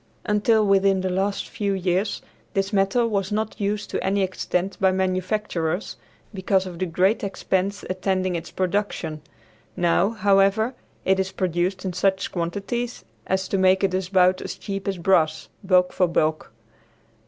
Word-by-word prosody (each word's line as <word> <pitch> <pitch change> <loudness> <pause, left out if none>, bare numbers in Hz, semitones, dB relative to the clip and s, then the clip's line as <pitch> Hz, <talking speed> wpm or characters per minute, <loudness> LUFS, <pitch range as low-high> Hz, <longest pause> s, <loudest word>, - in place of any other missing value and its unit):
Until 210 +1 +3
within 195 -1 +3
the 185 0 -1
last 195 +2 -1
few 200 -2 -2
years 190 +2 -1 0.3
this 195 +1 0
metal 200 +5 +2
was 200 -3 -1
not 215 0 -2
used 205 0 -2
to - - -2
any 195 +1 +1
extent 185 0 -2
by 190 -1 +5
manufacturers, 185 -1 -1 0.4
because 190 0 +1
of 175 -2 -8
the 185 - -1
great 185 +7 +1
expense 195 0 -1
attending 185 0 -1
its 165 - -5
production. 185 -5 -2 0.6
Now, 175 +2 +3
however, 205 +2 +2 0.3
it 190 0 +3
is 190 0 -1
produced 185 +1 -1
in 185 - -2
such 190 +1 0
quantities 200 +8 -3 0.2
as 190 0 0
to 195 - 0
make 190 +1 +4
it 190 -1 +2 0.2
about 185 -1 +4
as - - -5
cheap 195 -1 -5
as 195 -2 -1
brass, 160 -3 +2
bulk 180 -1 +3
for 180 - +2
bulk. 155 -4 0
190 Hz, 155 wpm, -23 LUFS, 185-200 Hz, 0.6 s, by